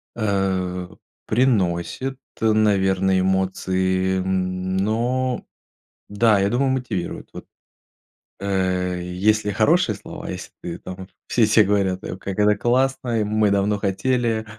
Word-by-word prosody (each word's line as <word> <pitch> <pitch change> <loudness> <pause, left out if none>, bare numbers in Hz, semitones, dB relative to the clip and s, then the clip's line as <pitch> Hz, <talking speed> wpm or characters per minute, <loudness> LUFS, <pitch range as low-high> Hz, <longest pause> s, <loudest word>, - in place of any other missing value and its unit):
Э, 95 -4 -1 0.4
приносит, 115 +1 0 0.2
наверное, 95 -4 +3
эмоции, 95 0 0
м, 95 0 -1
но, 120 +5 0 0.6
да, 105 0 +3
я 100 +1 +2
думаю, 130 +3 +1
мотивирует. 125 -9 -3
Вот, - - -9 0.9
э, 95 -2 -1
если 105 +4 +1
хорошие 115 - +2
слова, - - -9
если - - -7
ты 85 -1 -5
там 95 0 -8 0.2
все 115 - +3
все 110 +1 +5
говорят: 95 -2 +1 0.2
"Как 100 +1 -4
это 105 0 +4
классно, 120 -1 +1
мы 105 0 +2
давно 100 +1 +1
хотели! 115 +3 0
100 Hz, 110 wpm, -22 LUFS, 95-110 Hz, 0.9 s, все